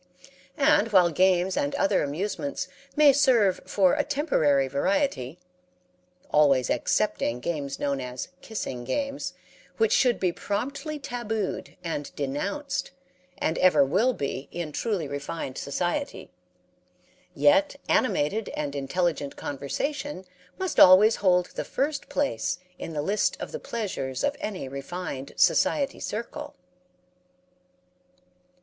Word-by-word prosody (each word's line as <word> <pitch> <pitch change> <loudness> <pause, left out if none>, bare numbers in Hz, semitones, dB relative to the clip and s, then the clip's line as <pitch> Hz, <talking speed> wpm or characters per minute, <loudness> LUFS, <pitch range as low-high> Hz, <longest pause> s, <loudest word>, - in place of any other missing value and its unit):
And 275 -6 +3
while 180 -4 +5
games 185 +2 +3
and 285 -1 -1
other 290 +1 +2
amusements 200 - -3 0.3
may 295 -2 +7
serve 235 -9 +3
for 190 -3 +3
a - - +1
temporary 160 - +2
variety 140 - 0 0.9
(always 140 -4 +4
excepting 120 +1 0
games 140 -1 -3
known 140 -2 -1
as 125 0 -5
"kissing 130 - -5
games," 275 - -3 0.4
which 450 - +2
should 245 -3 +3
be 185 -2 +1
promptly 280 - -3
tabooed 230 -7 -4
and 160 -4 -3
denounced, 145 - -3 0.5
and 160 -4 -1
ever 155 -6 +5
will 230 - +2
be 140 - -4
in 170 -3 -4
truly 190 -2 -2
refined 140 -1 -5
society), 175 - -3 1.0
yet 290 0 +4
animated 215 - +1
and 145 -1 -3
intelligent 145 0 -1
conversation 185 - -4 0.3
must 375 -4 -1
always 195 +4 +8
hold 180 -2 +3
the - - -3
first 285 +1 -2
place 280 -9 -1 0.2
in 165 - -6
the 145 -1 -2
list 205 +5 +1
of - - -6
the 475 - -5
pleasures 185 - -4
of 285 - +1
any 205 - -4
refined 140 +1 -6
society 280 -1 +2
circle. 290 +7 -5
185 Hz, 115 wpm, -26 LUFS, -, 1.0 s, always